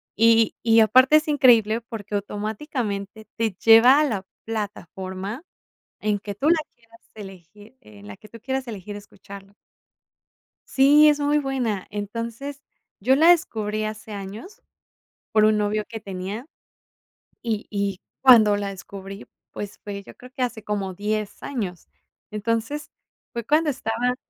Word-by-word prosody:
Y 225 Hz, 0 st, +4 dB
y 225 Hz, -1 st, +5 dB
aparte 255 Hz, +7 st, +6 dB
es 310 Hz, -, -1 dB
increíble, 235 Hz, -6 st, +4 dB
porque 210 Hz, -3 st, -7 dB
automáticamente 210 Hz, 0 st, -4 dB
te 225 Hz, -2 st, 0 dB
lleva 230 Hz, +8 st, +7 dB
a -, -, +4 dB
la 210 Hz, -9 st, -2 dB, 0.2 s
plataforma 200 Hz, -, -5 dB, 0.6 s
en 210 Hz, -1 st, 0 dB
que 205 Hz, -1 st, -7 dB
tú 280 Hz, +9 st, +1 dB
la 340 Hz, -, +5 dB, 0.2 s
quieras 230 Hz, -1 st, -22 dB
elegir, 205 Hz, +3 st, -13 dB
eh, 105 Hz, -1 st, -16 dB
en 100 Hz, -, -13 dB
la 100 Hz, -, -9 dB
que 215 Hz, -, -16 dB
tú 230 Hz, -, -12 dB
quieras 265 Hz, +2 st, -3 dB
elegir 205 Hz, -2 st, -7 dB
escucharlo. 200 Hz, -1 st, -12 dB, 1.1 s
Sí, 290 Hz, +3 st, +6 dB
es 295 Hz, -1 st, +2 dB
muy 290 Hz, +1 st, +2 dB
buena. 250 Hz, -8 st, -2 dB
Entonces, 230 Hz, +7 st, -5 dB, 0.4 s
yo 260 Hz, +6 st, +3 dB
la 320 Hz, +3 st, +5 dB
descubrí 215 Hz, -, +1 dB
hace 215 Hz, 0 st, -6 dB
años 205 Hz, -, -9 dB, 0.7 s
por 215 Hz, -1 st, +4 dB
un 215 Hz, 0 st, +4 dB
novio 210 Hz, 0 st, 0 dB
que 225 Hz, -, -7 dB
tenía, 200 Hz, +5 st, -6 dB, 1.0 s
y 225 Hz, -3 st, -2 dB
y 200 Hz, -2 st, -2 dB, 0.2 s
cuando 225 Hz, -6 st, +7 dB
la 200 Hz, -1 st, -3 dB
descubrí, 195 Hz, +1 st, -9 dB, 0.3 s
pues, 205 Hz, -1 st, -7 dB
fue 200 Hz, -1 st, -6 dB
yo -, -, -14 dB
creo 250 Hz, -, -14 dB
que 260 Hz, -, -2 dB
hace 235 Hz, -3 st, -2 dB
como 200 Hz, -3 st, -3 dB
10 210 Hz, +1 st, -3 dB
años. 195 Hz, -, -5 dB, 0.4 s
Entonces, 230 Hz, +7 st, -3 dB, 0.4 s
fue 235 Hz, -2 st, -4 dB
cuando 305 Hz, +4 st, +2 dB
estaba 245 Hz, -1 st, -1 dB
215 Hz, 145 wpm, -23 LUFS, 205-250 Hz, 1.1 s, lleva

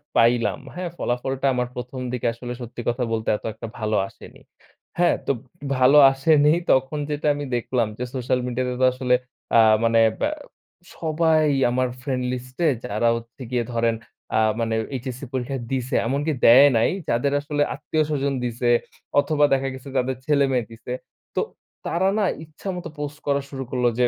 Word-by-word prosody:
পাইলাম, 115 Hz, -3 st, +3 dB, 0.2 s
হ্যাঁ? 180 Hz, -1 st, -3 dB
ফলাফলটা 130 Hz, +2 st, -2 dB
আমার 125 Hz, -1 st, 0 dB
১ম 125 Hz, +1 st, -6 dB
দিকে 125 Hz, -, -1 dB
আসলে 120 Hz, +1 st, -6 dB
সত্যি 120 Hz, 0 st, -7 dB
কথা 120 Hz, +1 st, -1 dB
বলতে 110 Hz, -1 st, -1 dB
এত -, -, -15 dB
একটা 115 Hz, -, -8 dB
ভালো 110 Hz, 0 st, 0 dB
আসেনি। -, -, -15 dB, 0.6 s
হ্যাঁ? 175 Hz, -, +4 dB
তো -, -, +2 dB, 0.5 s
ভালো 130 Hz, +3 st, +6 dB
আসেনি 145 Hz, +2 st, +4 dB, 0.2 s
তখন 135 Hz, +3 st, +2 dB
যেটা 150 Hz, 0 st, -2 dB
আমি 145 Hz, 0 st, -4 dB
দেখলাম 120 Hz, -1 st, 0 dB
যে -, -, -1 dB
সোশ্যাল 125 Hz, 0 st, 0 dB
মিডিয়া 125 Hz, +1 st, -1 dB
তে -, -, -2 dB
তো -, -, +6 dB
আসলে 125 Hz, -1 st, +2 dB, 0.4 s
আ -, -, +8 dB, 0.2 s
মানে 115 Hz, 0 st, +4 dB, 0.2 s
ব্যা 295 Hz, -, +1 dB, 0.7 s
সবাই 160 Hz, -1 st, +2 dB, 0.3 s
আমার 130 Hz, +1 st, +1 dB
ফ্রেন্ড 130 Hz, -1 st, -2 dB
লিস্টে 125 Hz, +6 st, -2 dB, 0.2 s
যারা 105 Hz, +3 st, 0 dB
হচ্ছে 115 Hz, +3 st, -9 dB
গিয়ে 120 Hz, -2 st, 0 dB
ধরেন 115 Hz, 0 st, +1 dB, 0.4 s
আ -, -, +4 dB, 0.2 s
মানে 115 Hz, -1 st, 0 dB, 0.2 s
এইচএসসি 130 Hz, +1 st, -5 dB
পরীক্ষা 130 Hz, +1 st, -2 dB
দিছে। 130 Hz, -1 st, -1 dB
এমনকি 145 Hz, +5 st, 0 dB
দেয় 130 Hz, +5 st, +9 dB
নাই 110 Hz, -, +3 dB, 0.2 s
যাদের 125 Hz, +4 st, +1 dB
আসলে 145 Hz, 0 st, -2 dB
আত্মীয়-স্বজন 150 Hz, -3 st, -1 dB
দিছে, 120 Hz, 0 st, -1 dB, 0.5 s
অথবা 150 Hz, 0 st, +3 dB
দেখা 135 Hz, 0 st, +1 dB
গেছে 130 Hz, +1 st, -9 dB
যাদের 130 Hz, +1 st, 0 dB
ছেলেমেয়ে 135 Hz, -5 st, +2 dB
দিছে। 115 Hz, +2 st, -7 dB, 0.4 s
তো -, -, +2 dB, 0.5 s
তারা 185 Hz, +3 st, +1 dB
না 205 Hz, -, +2 dB, 0.2 s
ইচ্ছামত 180 Hz, +3 st, -6 dB
পোস্ট 145 Hz, 0 st, -5 dB
করা 140 Hz, 0 st, +2 dB
শুরু 135 Hz, -1 st, -5 dB
করলো 125 Hz, -1 st, +2 dB
যে 125 Hz, -, +5 dB
130 Hz, 165 wpm, -23 LUFS, 120-145 Hz, 0.7 s, দেয়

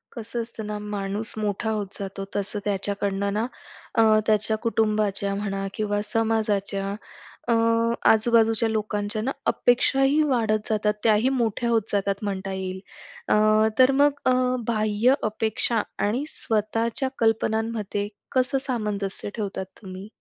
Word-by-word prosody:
कसं 230 Hz, +1 st, -4 dB
असतं 230 Hz, -1 st, -5 dB
ना, 210 Hz, 0 st, -3 dB, 0.2 s
माणूस 200 Hz, +2 st, -3 dB
मोठा 215 Hz, +1 st, -2 dB
होत 210 Hz, -2 st, -2 dB
जातो 195 Hz, 0 st, -5 dB
तसं 205 Hz, +1 st, -1 dB
त्याच्याकडनं 200 Hz, 0 st, -1 dB
ना 215 Hz, +2 st, 0 dB, 0.5 s
अ, 225 Hz, -, +5 dB, 0.2 s
त्याच्या 215 Hz, 0 st, +4 dB
कुटुंबाच्या 215 Hz, -3 st, 0 dB
म्हणा 195 Hz, -1 st, -3 dB
किंवा 205 Hz, -2 st, -1 dB
समाजाच्या 210 Hz, -2 st, 0 dB, 0.5 s
अ, 235 Hz, -, +3 dB, 0.6 s
आजूबाजूच्या 225 Hz, 0 st, +3 dB
लोकांच्या 210 Hz, -1 st, -2 dB
ना 255 Hz, +5 st, -1 dB, 0.2 s
अपेक्षाही 270 Hz, +4 st, +3 dB
वाढत 225 Hz, -7 st, 0 dB
जातात 210 Hz, -1 st, +1 dB
त्याही 220 Hz, +2 st, +4 dB
मोठ्या 235 Hz, +1 st, 0 dB
होत 230 Hz, -1 st, +3 dB
जातात, 200 Hz, -1 st, +1 dB
म्हणता 195 Hz, -1 st, -3 dB
येईल. 190 Hz, 0 st, -4 dB, 0.5 s
अ, 215 Hz, +1 st, +4 dB
तर 255 Hz, +1 st, +7 dB
मग 290 Hz, 0 st, +6 dB
अ, 255 Hz, -, +4 dB, 0.3 s
बाह्य 215 Hz, +2 st, +2 dB
अपेक्षा 220 Hz, +1 st, 0 dB, 0.3 s
आणि 240 Hz, +7 st, -1 dB
स्वतःच्या 225 Hz, +4 st, -1 dB
कल्पनांमध्ये 220 Hz, -2 st, 0 dB, 0.3 s
कसं 260 Hz, +1 st, +2 dB
सामंजस्य 210 Hz, -6 st, -2 dB
ठेवतात 200 Hz, -4 st, -4 dB, 0.2 s
तुम्ही? 190 Hz, -1 st, -8 dB
215 Hz, 125 wpm, -24 LUFS, 200-225 Hz, 0.6 s, तर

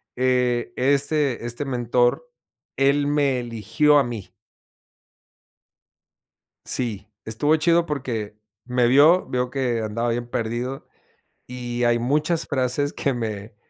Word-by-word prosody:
eh, 125 Hz, -2 st, +1 dB
este 140 Hz, -1 st, +1 dB
este 120 Hz, +3 st, -4 dB
mentor, 120 Hz, -, 0 dB, 0.5 s
él 140 Hz, +1 st, +3 dB
me 145 Hz, -3 st, +1 dB
eligió 120 Hz, +5 st, +2 dB
a -, -, +3 dB
mí. 115 Hz, -6 st, -7 dB, 2.3 s
Sí, 110 Hz, -5 st, -3 dB, 0.2 s
estuvo 135 Hz, +8 st, +1 dB
chido, 170 Hz, +2 st, +2 dB
porque 120 Hz, -9 st, -4 dB, 0.3 s
me 125 Hz, -1 st, +2 dB
vio, 150 Hz, +8 st, +5 dB
vio 125 Hz, 0 st, -1 dB
que 125 Hz, -4 st, -1 dB
andaba 115 Hz, +2 st, -2 dB
bien 120 Hz, +1 st, -3 dB
perdido, 120 Hz, +4 st, -3 dB, 0.6 s
y 120 Hz, -1 st, -4 dB
hay 120 Hz, 0 st, +3 dB
muchas 150 Hz, +7 st, 0 dB
frases 140 Hz, +1 st, 0 dB
que 140 Hz, -, -1 dB
me 110 Hz, -2 st, -5 dB
125 Hz, 115 wpm, -23 LUFS, 120-140 Hz, 2.3 s, vio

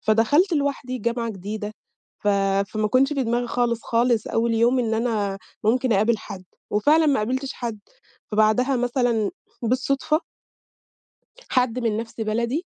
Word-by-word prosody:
فدخلت 285 Hz, -, +3 dB
لوحدي 280 Hz, -4 st, -1 dB
جامعة 235 Hz, 0 st, -1 dB
جديدة، 210 Hz, +2 st, -5 dB, 0.5 s
ف 210 Hz, -, -1 dB, 0.4 s
فما 215 Hz, -1 st, 0 dB
كانش 270 Hz, +5 st, +3 dB
في 275 Hz, -2 st, 0 dB
دماغي 240 Hz, 0 st, 0 dB
خالص، 235 Hz, -1 st, 0 dB
خالص 235 Hz, -1 st, +1 dB
أوّل 230 Hz, 0 st, 0 dB
يوم 240 Hz, +3 st, +3 dB
إن 225 Hz, -2 st, 0 dB
أنا 215 Hz, -4 st, -1 dB, 0.3 s
ممكن 250 Hz, +2 st, +2 dB
أقابل 215 Hz, +3 st, +2 dB
حد، 195 Hz, -3 st, -9 dB, 0.3 s
وفعلًا 300 Hz, +10 st, +4 dB
ما 285 Hz, -2 st, +3 dB
قابلتش 260 Hz, +5 st, -2 dB
حد. 230 Hz, -4 st, -5 dB, 0.5 s
فبعدها 220 Hz, +5 st, +3 dB
مثلًا 245 Hz, -3 st, +1 dB, 0.3 s
بالصدفة 265 Hz, +5 st, +1 dB, 1.3 s
حد 250 Hz, -1 st, +1 dB
من 225 Hz, -3 st, 0 dB
نَفْس 225 Hz, +1 st, -6 dB
بلدي 235 Hz, -, -1 dB
235 Hz, 135 wpm, -23 LUFS, 215-255 Hz, 1.3 s, وفعلًا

